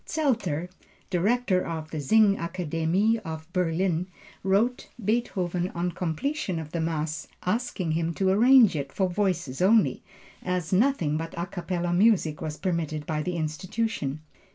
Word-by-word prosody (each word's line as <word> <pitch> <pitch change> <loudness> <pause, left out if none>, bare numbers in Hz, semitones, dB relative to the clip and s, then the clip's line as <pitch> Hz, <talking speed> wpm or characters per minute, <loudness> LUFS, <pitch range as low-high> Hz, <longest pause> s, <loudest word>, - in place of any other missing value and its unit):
Zelter, 225 - 0 0.4
director 195 +1 +2
of 160 -2 -5
the 155 - -3
Singakademie 185 +2 +2
of 160 -6 -7
Berlin 180 0 0 0.3
wrote 205 +6 +1 0.2
Beethoven 185 -5 0
on 175 +1 -1
completion 180 - -2
of 160 -2 -6
the 170 - -2
Mass, 160 -1 -2 0.2
asking 190 -4 -1
him 165 +1 0
to 190 -1 +1
arrange 235 0 +6
it 140 -2 -3
for 190 +4 +1
voices 175 -7 -1
only, 210 +3 +4 0.4
as 180 -2 -2
nothing 185 - +2
but 165 +1 -6
a 170 - -1
capella 175 -1 -3
music 180 -6 +3
was 155 -1 -4
permitted 160 -5 -2
by 155 -1 -1
the 180 +3 -3
institution. 155 -1 -2
180 Hz, 135 wpm, -26 LUFS, 160-205 Hz, 0.4 s, arrange